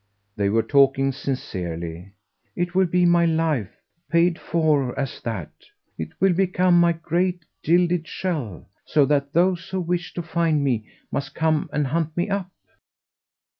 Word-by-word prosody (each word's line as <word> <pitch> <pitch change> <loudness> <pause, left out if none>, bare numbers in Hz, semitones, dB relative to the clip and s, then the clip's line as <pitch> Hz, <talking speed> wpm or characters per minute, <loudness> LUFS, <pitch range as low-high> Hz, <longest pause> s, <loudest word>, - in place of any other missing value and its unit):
They 100 -1 +1
were 110 +2 +2
talking 135 -1 +3
sincerely. 90 -9 -5 0.4
"It 175 0 -2
will 190 0 +3
be 180 +1 +2
my 175 0 +4
life 160 - 0 0.4
paid 170 0 +3
for 150 -6 +1
as 135 -2 -4
that. 115 -2 -4 0.4
It - - -4
will 190 -1 +4
become 180 -1 +3
my 170 0 +4
great 170 +1 -1 0.2
gilded 175 0 +2
shell; 150 - -4 0.2
so 145 -2 +3
that 140 0 0
those 180 +1 +1
who 190 - -2
wish 175 -3 -3
to 175 - -3
find 165 -3 +1
me 120 -6 0 0.2
must 140 - -4
come 160 -1 +1
and 150 -1 0
hunt 160 +3 -2
me 175 +4 0
up." 195 -2 -2
160 Hz, 150 wpm, -23 LUFS, 135-175 Hz, 0.4 s, my